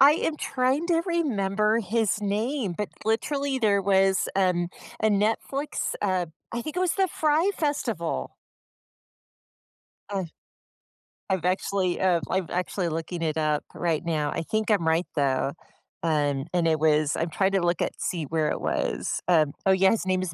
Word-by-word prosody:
I 280 +2 +9
am 310 0 -1
trying 265 +4 0
to 335 -1 +3
remember 215 - +1
his 220 0 0
name, 210 +1 -1
but 210 - -2 0.2
literally 275 +5 0
there 205 -4 +3
was, 195 0 +3
um, 180 -3 +2 0.3
a 220 - +4
Netflix 220 +8 0
uh, 185 -3 +1 0.3
I 235 +1 -2
think 310 +5 -6
it - - +1
was 370 -2 +2
the 385 -1 +2
Fry 315 +4 +2
Festival. 295 -3 -2 1.7
Uh, 195 -2 -2 1.1
I'm 190 -2 +1
actually 185 0 0
uh, 185 -2 +3
I'm 185 -2 0
actually 180 0 -1
looking 165 +2 -4
it 160 -1 -1
up 155 -1 +1
right 165 -2 -1
now. 155 -3 -1
I - - -2
think 215 +6 -1
I'm 195 -7 +2
right 165 +2 +2
though. 140 -1 +1 0.5
Um, 145 -4 +1
and 175 -2 +2
it 160 -1 +2
was 155 -1 +3
I'm 165 - -1
trying 190 +4 +1
to 195 - +3
look 175 -1 +1
at, - - 0
see 170 -3 -2
where 155 +1 0
it - - -2
was. - - -1
Um, 155 -5 +3
oh 195 - +5
yeah. 190 0 +5
His 225 - 0
name 185 -1 +1
is 185 -4 -3
190 Hz, 170 wpm, -26 LUFS, 165-225 Hz, 1.7 s, I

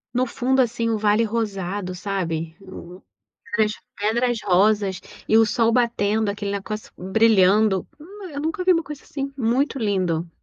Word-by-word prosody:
No 255 +1 +2
fundo, 260 +2 +1
assim, 235 -1 0
o 225 - +1
vale 210 +2 +2
rosado, 200 -4 -3
sabe? 170 -4 -3 1.0
Nas 215 -1 +3 0.3
pedras 235 +3 +1
rosas 195 0 +2 0.3
e 220 - +3
o 225 - +7
sol 225 +1 +2
batendo, 220 -3 +1
aquele 200 0 -3
negócio 210 +2 -5
brilhando, 195 0 +3
hum, 380 +3 -10
eu 285 - -5
nunca 320 +4 -2
vi 370 - +4
uma 330 -2 +2
coisa 300 -4 -9
assim, 275 -1 -5
muito 265 +3 0
lindo. 180 -6 -1
215 Hz, 150 wpm, -22 LUFS, 195-245 Hz, 1.0 s, o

